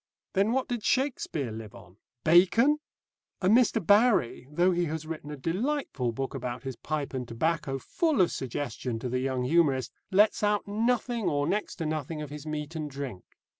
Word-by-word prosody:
Then 200 +3 +2
what 260 +1 0
did 240 -3 -3
Shakespeare 225 - 0
live 110 -1 -8
on? 95 0 -15 0.3
Bacon? 210 - +5 0.6
And 195 +4 +4
Mr. 230 -5 +3
Barrie, 205 - +4
though 175 +5 +3
he 175 0 +1
has 160 0 -4
written 155 -2 -6
a 150 - -6
delightful 170 - -1
book 135 +3 -4
about 125 -2 -4
his 135 -2 -5
pipe 145 +4 -3
and 125 -2 -3
tobacco, 145 +3 -1
full 315 - 0
of 180 - +4
suggestion 130 -2 -3
to 125 +2 -4
the 125 +1 0
young 130 -1 -1
humorist, 135 -3 +2 0.2
lets 205 +3 +4
out 210 -1 +1
nothing 230 +1 0
or 145 -1 0
next 210 +7 -1
to 165 - -4
nothing 155 0 -3
of 150 -2 -6
his 150 +1 -8
meat 155 +1 -4
and 155 -2 -3
drink. 135 -9 -6
155 Hz, 180 wpm, -28 LUFS, 135-205 Hz, 0.6 s, Bacon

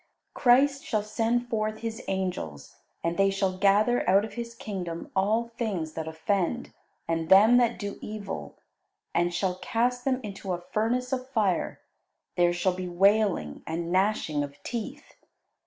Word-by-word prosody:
Christ 275 +3 +4
shall 215 -2 -1
send 230 +3 0
forth 215 -2 -2
His 225 -1 -4
angels, 180 - -3 0.3
and 170 +1 -1
they 195 0 +4
shall 195 -1 0
gather 205 +3 +3
out 195 +3 +5
of 215 - -10
His 235 +1 -6
Kingdom 185 -9 -5
all 215 +5 +1
things 180 -9 -2
that 160 0 -4
offend 190 +7 -1 0.3
and 165 -1 -1
them 215 +6 +8
that 240 -1 +3
do 200 -1 -5
evil, 210 -2 -6 0.6
and 175 +1 +2
shall 180 +1 -1
cast 245 +2 0
them 260 -1 +1
into 195 -2 -4
a 175 - -3
furnace 245 +7 -1
of 255 0 -3
fire; 205 -9 0 0.5
there 175 0 +4
shall 175 +1 +1
be 180 0 -5
wailing 195 - +2
and 165 +1 -3
gnashing 185 -6 +1
of 140 0 -8
teeth. 255 +5 -6
200 Hz, 155 wpm, -27 LUFS, 175-230 Hz, 0.6 s, them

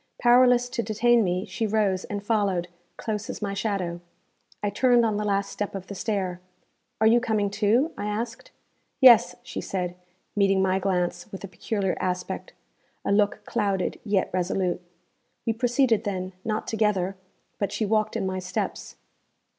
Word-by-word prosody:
Powerless 245 0 +5
to 235 - -2
detain 230 +2 +3
me, 180 +1 -1
she 225 - -2
rose 200 -3 +1
and 205 -1 -5
followed, 200 -5 +1 0.3
close 210 -2 -3
as - - -5
my 200 -2 -2
shadow. 195 -4 -2 0.6
I 205 - 0
turned 240 +2 +4
on 215 -2 0
the 210 - -1
last 200 -1 0
step 205 -1 -4
of 190 -1 -5
the 200 - -7
stair. 190 -3 -2 0.6
'Are 220 - +3
you 230 +2 +6
coming 215 -4 0
too?' 230 +11 +2
I 205 - -2
asked. 225 - -4 0.5
'Yes,' 230 -9 +7
she - - -5
said, 180 -2 -3 0.4
meeting 195 -1 +3
my 190 0 +2
glance 180 -2 -1
with 195 - -8
a - - -4
peculiar 195 0 -2
aspect 180 0 -3 0.5
a - - +1
look 205 0 +2
clouded, 200 -5 -1
yet 200 -3 0
resolute. 180 0 0 0.6
We 225 - +1
proceeded 240 -1 +2
then, 190 -3 -3
not 215 -1 -2
together, 205 -4 0 0.4
but 200 - -1
she 220 - -1
walked 215 +1 +1
in - - -2
my 185 0 -2
steps. 185 0 -4
205 Hz, 160 wpm, -26 LUFS, 190-220 Hz, 0.6 s, Yes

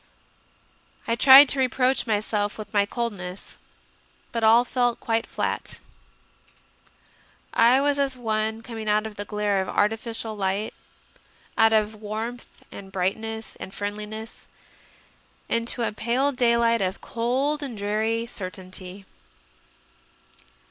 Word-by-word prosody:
I 230 - +1
tried 270 +3 +9
to 275 - 0
reproach 255 0 +1
myself 210 -1 -1
with 210 -1 -9
my 200 -1 +3
coldness, 200 -6 -5 0.8
but 230 -2 -2
all 230 +2 +6
fell 245 -1 +1
quite 225 0 -1
flat. - - -3 1.7
I 240 +3 +5
was 285 0 +1
as 270 -2 0
one 220 -1 -2
coming 225 -2 -5
out 210 +1 +2
of 220 -1 -7
the 205 0 -6
glare 205 -2 0
of 190 - -4
arti 210 +2 +2
ficial 225 -1 -4
light, 195 +1 -1 0.8
out 225 0 +5
of 215 -1 +2
warmth 220 +3 -5 0.2
and 195 -1 -10
brightness 220 +4 -3
and 190 - -9
friendliness, 210 +2 -6 1.0
into 230 +1 -1
a - - 0
pale 240 +6 0
daylight 235 -3 +2
of 190 0 -1
cold 265 +6 -1
and 260 -6 -5
dreary 220 +3 -1
certainty. 185 -2 -8
220 Hz, 120 wpm, -25 LUFS, 205-235 Hz, 1.7 s, tried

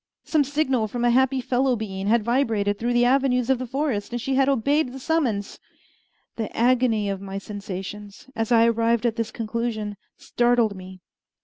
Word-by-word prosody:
Some 310 -2 +2
signal 270 -5 0
from 240 +3 -2
a 240 - +4
happy 260 +1 +2
fellow 255 +1 +1
being 195 -3 -5
had 230 +1 +3
vibrated 220 -4 0
through 240 +1 0
the 240 0 +3
avenues 255 -1 +2
of 260 - +1
the 255 - -4
forest, 265 -5 -2
and 240 - -2
she 270 +3 -2
had 270 +1 +3
obeyed 275 +2 +1
the 270 - -7
summons. 255 -10 -1 0.8
The 225 -2 -3
agony 235 -3 +2
of 195 -1 -3
my 195 0 -6
sensations, 200 +1 -7
as 225 +1 -2
I 230 -1 +6
arrived 230 0 +1
at 230 -2 +1
this 230 -1 -2
conclusion, 220 -2 -3 0.2
startled 240 -3 +1
me. 185 0 -11
235 Hz, 180 wpm, -24 LUFS, 210-255 Hz, 0.8 s, I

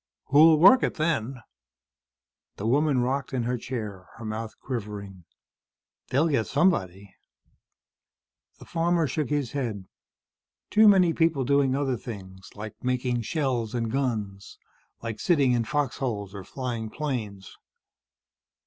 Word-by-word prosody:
"Who'll 155 +3 +7
work 195 +11 +7
it - - -1
then?" 135 -6 -1 1.1
The 100 - -6
woman 140 +2 +2
rocked 135 +2 -2
in 125 -2 0
her 125 +2 -1
chair, 105 -7 -6
her 115 - -8
mouth 110 +1 -5
quivering. 100 -7 -6 0.8
"They'll 140 +6 +2
get 135 -8 0
somebody." 100 - 0 1.4
The - - -13
farmer 170 0 +1
shook 150 -1 -2
his 145 -5 -1
head. 115 -9 -3 0.9
"Too 215 +1 +6
many 185 -5 +5
people 160 -5 +2
doing 140 -1 +2
other 135 -3 0
things, 95 -4 -9
like 105 0 -9
making 125 -1 0
shells 125 -5 -2
and 115 -2 -1
guns, 110 -7 -3 0.5
like 115 -2 -5
sitting 145 -7 +3
in 120 -2 +1
fox 145 +1 -1
holes 105 -7 -3
or 100 -2 -7
flying 120 -1 -4
planes." 110 -10 -5
125 Hz, 130 wpm, -26 LUFS, 110-145 Hz, 1.4 s, Who'll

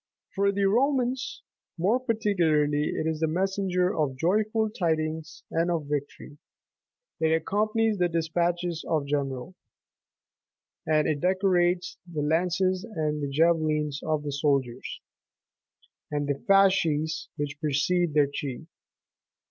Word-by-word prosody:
For 200 0 +2
the 200 0 0
Romans 255 +4 +1 0.3
more 200 +9 +2
particularly 170 -11 +1
it - - -2
is 160 -1 -1
the 160 - +1
messenger 185 +2 0
of 140 -4 -1
joyful 215 - +1
tidings, 160 -4 -2
and 165 +2 +1
of 165 -4 -1
victory: 145 0 -5 0.8
it 160 0 +2
accompanies 215 +6 +1
the 180 - +3
despatches81 170 +1 -1
of 155 -3 +1
the 140 - -10
general, 140 +3 -2 1.3
and 155 -1 +3
it 150 -2 0
decorates 180 0 +1
the 150 -3 -2
lances 180 +4 +1
and 150 -9 -2
javelins 155 -1 +1
of 155 -2 -1
the 145 - -3
soldiers 140 -4 -1 1.1
and 145 -1 -2
the 140 -1 -1
fasces 185 -6 +3
which 145 0 -4
precede 155 +2 +1
their 150 -1 +5
chief. 140 0 -5
165 Hz, 120 wpm, -27 LUFS, 150-190 Hz, 1.3 s, their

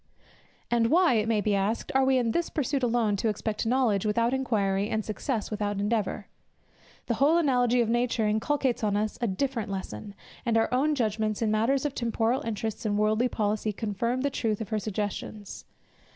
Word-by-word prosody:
And 235 -1 +3
why, 345 0 +4
it 220 -1 +1
may 220 -2 +2
be 205 +1 +1
asked, 200 +3 -1
are 265 0 +4
we 265 0 +3
in 235 -2 +1
this 340 +7 -1
pursuit 280 -2 -1
alone 230 -4 +1
to 225 - -1
expect 215 +1 -2
knowledge 230 -5 +2
without 230 +3 +1
inquiry, 205 -6 0
and 220 -2 -1
success 215 +2 -3
without 205 -1 -2
endeavour? 210 -1 -1 0.8
The 235 - 0
whole 285 +8 +3
analogy 250 -6 +3
of 235 - +1
nature 240 -1 +1
inculcates 245 +3 0
on 205 -1 +1
us 215 0 -2
a 235 - +1
different 225 +1 -2
lesson, 190 - -6 0.3
and 230 -2 +1
our 225 +2 +1
own 295 +4 +2
judgments 215 -3 -1
in 215 - +1
matters 245 +6 +1
of 290 - -1
temporal 235 +1 0
interests 220 -2 -4
and 205 -2 0
worldly 215 +3 +2
policy 215 -2 -1
confirm 230 +4 -2
the 280 +1 0
truth 220 -5 -1
of 220 - -5
her 215 -1 0
suggestions. 205 0 -5
225 Hz, 185 wpm, -27 LUFS, 210-250 Hz, 0.8 s, why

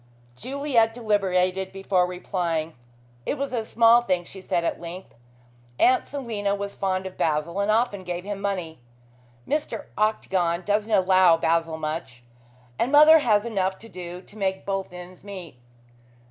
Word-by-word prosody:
Juliet 250 - 0
deliberated 190 -4 0
before 190 -2 +1
replying. 175 -3 -2 0.5
"It 290 - -2
was 275 -1 -3
a 230 -3 -1
small 230 +2 +5
thing," 180 -7 -1
she 190 +2 -11
said 180 -2 -1
at - - -2
length. 175 +2 -8 0.7
"Aunt 255 +1 +4
Selina 220 -8 -2
was 200 0 -5
fond 190 -1 -2
of 190 - -8
Basil 160 +4 0
and 200 +1 0
often 215 -3 +1
gave 175 0 -4
him 200 0 -5
money. 180 -6 -3 0.7
Mr. 290 -7 -2
Octagon 185 -5 0
doesn't 210 +3 0
allow 185 -3 +5
Basil 165 0 0
much, 155 -6 -5 0.6
and 245 - +1
mother 305 +2 +8
has 215 -6 +2
enough 190 -4 -1
to 225 - -13
do 180 -1 -8
to 210 - -16
make 190 -1 -1
both 195 -2 -3
ends 180 0 -11
meet. 185 -10 -9
190 Hz, 150 wpm, -25 LUFS, 175-220 Hz, 0.7 s, mother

